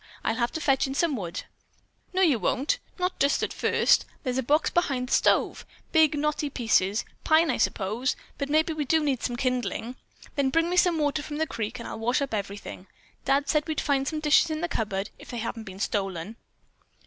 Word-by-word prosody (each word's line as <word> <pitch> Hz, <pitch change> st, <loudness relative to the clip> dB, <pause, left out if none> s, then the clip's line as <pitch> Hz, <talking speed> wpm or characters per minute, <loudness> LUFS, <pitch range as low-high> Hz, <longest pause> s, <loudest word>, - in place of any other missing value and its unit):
I'll -, -, +1 dB
have 235 Hz, -1 st, 0 dB
to -, -, -2 dB
fetch 270 Hz, -3 st, +2 dB
in 270 Hz, -, -4 dB
some 320 Hz, -1 st, +1 dB
wood." 180 Hz, -4 st, -5 dB, 0.7 s
"No, 375 Hz, 0 st, +2 dB
you 290 Hz, -10 st, +4 dB
won't! 270 Hz, -, 0 dB, 0.2 s
Not 360 Hz, 0 st, -2 dB
just 280 Hz, +1 st, +2 dB
at -, -, -2 dB
first. -, -, +3 dB, 0.2 s
There's 255 Hz, -2 st, -1 dB
a -, -, +2 dB
box 295 Hz, +5 st, +2 dB
full 345 Hz, -, +4 dB
behind 255 Hz, -6 st, -2 dB
the -, -, 0 dB
stove. -, -, +2 dB, 0.3 s
Big, 315 Hz, -2 st, +4 dB
knotty 300 Hz, 0 st, 0 dB
pieces; 225 Hz, -5 st, +1 dB, 0.2 s
pine, 315 Hz, -1 st, +4 dB
I -, -, -1 dB
suppose; 220 Hz, +6 st, 0 dB, 0.2 s
but 280 Hz, -1 st, -2 dB
maybe 315 Hz, +2 st, +2 dB
we 305 Hz, -1 st, -2 dB
do 315 Hz, +3 st, +2 dB
need 275 Hz, -5 st, 0 dB
some 245 Hz, -, -2 dB
kindling. 250 Hz, -1 st, -2 dB, 0.4 s
Then 275 Hz, -2 st, +2 dB
bring 330 Hz, +5 st, +1 dB
me -, -, +1 dB
some 355 Hz, -2 st, +4 dB
water 295 Hz, 0 st, 0 dB
from 295 Hz, 0 st, -6 dB
the 320 Hz, -, +1 dB
creek 230 Hz, -4 st, -4 dB
and 235 Hz, -, -7 dB
I'll -, -, -6 dB
wash 245 Hz, +4 st, +1 dB
up 280 Hz, -4 st, -3 dB
everything. 200 Hz, -2 st, -5 dB, 0.4 s
Dad 275 Hz, +1 st, +2 dB
said 300 Hz, 0 st, +1 dB
we'd 315 Hz, -, -1 dB
find 275 Hz, -2 st, +1 dB
some 310 Hz, 0 st, -2 dB
dishes 310 Hz, +2 st, +4 dB
in 310 Hz, 0 st, -3 dB
the 345 Hz, -, 0 dB
cupboard, 205 Hz, -, -2 dB
if -, -, -13 dB
they 240 Hz, -, -5 dB
hadn't 230 Hz, -1 st, -4 dB
been 190 Hz, -1 st, -9 dB
stolen." 195 Hz, -1 st, -2 dB
275 Hz, 215 wpm, -27 LUFS, 230-310 Hz, 0.7 s, you